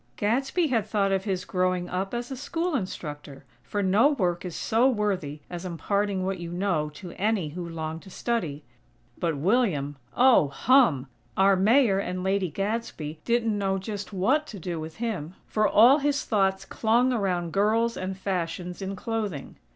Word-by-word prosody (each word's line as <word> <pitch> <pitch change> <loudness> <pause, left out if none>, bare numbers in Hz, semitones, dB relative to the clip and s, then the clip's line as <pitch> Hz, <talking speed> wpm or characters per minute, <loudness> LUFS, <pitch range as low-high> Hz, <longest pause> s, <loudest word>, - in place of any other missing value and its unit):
Gadsby 270 - +1
had 225 -5 +1
thought 205 -2 +1
of 195 +1 0
his 185 -3 -2
growing 185 -1 0
up 190 +2 -3
as 240 +2 -4
a - - -3
school 330 +6 -2
instructor, 150 - -5 0.2
for 205 +8 -3
no 200 +8 +5
work 180 - 0
is 180 -3 -6
so 235 +4 +2
worthy 190 - -1
as 175 0 -6
imparting 190 +2 -1
what 190 -1 -2
you 170 -1 -6
know 175 -4 0
to 175 +2 -9
any 205 -6 +1
who 170 +2 -6
long 160 -1 -4
to 190 - -14
study. 175 -10 -2 0.6
But 165 -4 0
William! 155 - +1 0.2
Oh, 250 - +6
hum!! 155 - +3 0.3
Our 195 +1 +5
Mayor 210 +1 +4
and 180 -1 -3
Lady 190 -1 +1
Gadsby 195 -5 -3
didn't 235 -2 +1
know 195 -1 0
just 205 +1 -5
what 255 +11 +1
to 215 - -8
do 175 -2 -4
with 160 0 -7
him; 190 -8 -4
for 215 -1 +1
all 245 +9 +6
his 285 0 0
thoughts 195 -3 +1
clung 240 +3 +2
around 180 -7 -1
girls 225 +3 +2
and 185 0 -4
fashions 180 -1 -3
in 195 0 -3
clothing. 210 -7 -4
195 Hz, 170 wpm, -26 LUFS, 175-225 Hz, 0.6 s, Oh